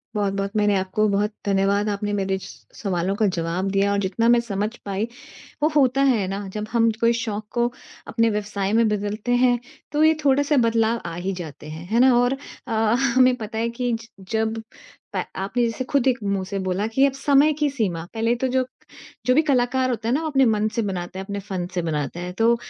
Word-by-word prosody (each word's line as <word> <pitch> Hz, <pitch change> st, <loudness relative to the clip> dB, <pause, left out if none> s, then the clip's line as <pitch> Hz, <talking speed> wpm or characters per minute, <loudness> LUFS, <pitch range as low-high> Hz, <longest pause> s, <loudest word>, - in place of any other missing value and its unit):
बहुत-बहुत 195 Hz, -1 st, -1 dB
मैंने 210 Hz, -1 st, +3 dB
आपको 190 Hz, +3 st, +1 dB
बहुत 205 Hz, +2 st, +1 dB
धन्यवाद 200 Hz, +1 st, +2 dB
आपने 205 Hz, 0 st, -2 dB
मेरे 195 Hz, -1 st, 0 dB
स -, -, -12 dB, 0.2 s
सवालों 190 Hz, -1 st, -1 dB
का 215 Hz, -, +2 dB
जवाब 170 Hz, +4 st, -1 dB
दिया 200 Hz, +1 st, +2 dB
और 200 Hz, -, +1 dB
जितना 200 Hz, +4 st, 0 dB
मैं 240 Hz, -, +6 dB
समझ 210 Hz, -2 st, -2 dB, 0.2 s
पाई, 200 Hz, +3 st, -2 dB, 0.6 s
वो 305 Hz, -, +5 dB
होता 270 Hz, -2 st, +4 dB
है 210 Hz, -6 st, 0 dB
ना 195 Hz, +1 st, -4 dB
जब 210 Hz, 0 st, -4 dB
हम 230 Hz, -1 st, +4 dB
कोई 230 Hz, 0 st, +4 dB
शौक 215 Hz, -2 st, -3 dB
को 240 Hz, 0 st, +1 dB, 0.4 s
अपने 230 Hz, 0 st, +2 dB
व्यवसाय 205 Hz, -1 st, -2 dB
में 230 Hz, 0 st, +4 dB
बदलते 210 Hz, +3 st, -2 dB
हैं 245 Hz, -1 st, +3 dB, 0.3 s
तो 300 Hz, +1 st, +2 dB
ये 315 Hz, 0 st, +6 dB
थोड़ा-सा 285 Hz, +1 st, +3 dB
बदलाव 225 Hz, 0 st, +1 dB
आ 170 Hz, -, -4 dB
ही 185 Hz, +3 st, -3 dB
जाते 155 Hz, -1 st, -9 dB
हैं। 160 Hz, +2 st, -8 dB
है 235 Hz, -, +3 dB
ना 255 Hz, -1 st, +6 dB
और 245 Hz, +2 st, +3 dB, 0.3 s
अ, -, -, -6 dB, 0.4 s
हमें 255 Hz, -1 st, +5 dB
पता 220 Hz, -1 st, -6 dB
है 230 Hz, +1 st, 0 dB
कि 245 Hz, 0 st, -2 dB
ज 225 Hz, 0 st, -5 dB, 0.2 s
जब 220 Hz, 0 st, 0 dB, 0.5 s
प -, -, 0 dB
आपने 200 Hz, +6 st, -1 dB
जैसे 230 Hz, +3 st, -2 dB
खुद 270 Hz, -1 st, +1 dB
एक 255 Hz, -1 st, +3 dB
मुँह 200 Hz, -1 st, -1 dB
से 200 Hz, -, -3 dB
बोला 190 Hz, +2 st, -1 dB
कि 270 Hz, +3 st, +5 dB
अब 275 Hz, -, +2 dB
समय 280 Hz, +2 st, +4 dB
की 295 Hz, 0 st, 0 dB
सीमा, 195 Hz, -11 st, -2 dB
पहले 230 Hz, +1 st, +1 dB
तो 260 Hz, +2 st, -1 dB
जो 255 Hz, 0 st, +1 dB, 0.6 s
जो 250 Hz, -, +4 dB
भी 310 Hz, -, +6 dB
कलाकार 260 Hz, -3 st, +1 dB
होता 230 Hz, -2 st, -2 dB
है 235 Hz, -, +2 dB
ना, 310 Hz, -, 0 dB
वो 320 Hz, -, -2 dB
अपने 270 Hz, -2 st, +4 dB
मन 215 Hz, -1 st, +2 dB
से 230 Hz, -, +1 dB
बनाता 185 Hz, -2 st, -4 dB
है, -, -, -4 dB
अपने 200 Hz, 0 st, -4 dB
फन 190 Hz, -2 st, -4 dB
से 175 Hz, -, +1 dB
बनाता 155 Hz, 0 st, -3 dB
है। 180 Hz, 0 st, -4 dB
तो 230 Hz, +1 st, +4 dB
215 Hz, 220 wpm, -23 LUFS, 195-245 Hz, 0.6 s, मैं